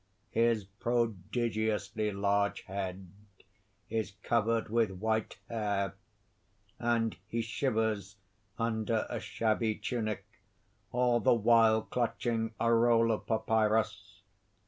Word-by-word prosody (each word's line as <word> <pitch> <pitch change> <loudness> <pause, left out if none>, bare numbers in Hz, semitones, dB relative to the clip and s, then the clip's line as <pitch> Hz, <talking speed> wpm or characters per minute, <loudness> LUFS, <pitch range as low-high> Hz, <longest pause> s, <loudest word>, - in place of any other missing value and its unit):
His 115 -2 +2
prodigiously 110 0 -1
large 100 +1 +1
head 95 -1 -5 0.8
is 110 -2 -2
covered 115 0 +1
with 115 -1 +2
white 110 +3 -2
hair; 100 -3 -1 0.9
and 115 -2 +1
he 115 +1 -2
shivers 110 -4 -1 0.4
under 115 -1 0
a - - -2
shabby 110 0 0
tunic, 110 0 -3 0.7
all 125 -1 +3
the 115 - +4
while 115 -1 +5
clutching 115 -2 -1
a 115 0 +3
roll 115 0 +4
of 110 - -3
papyrus. 110 -3 0
110 Hz, 100 wpm, -31 LUFS, 105-115 Hz, 0.9 s, while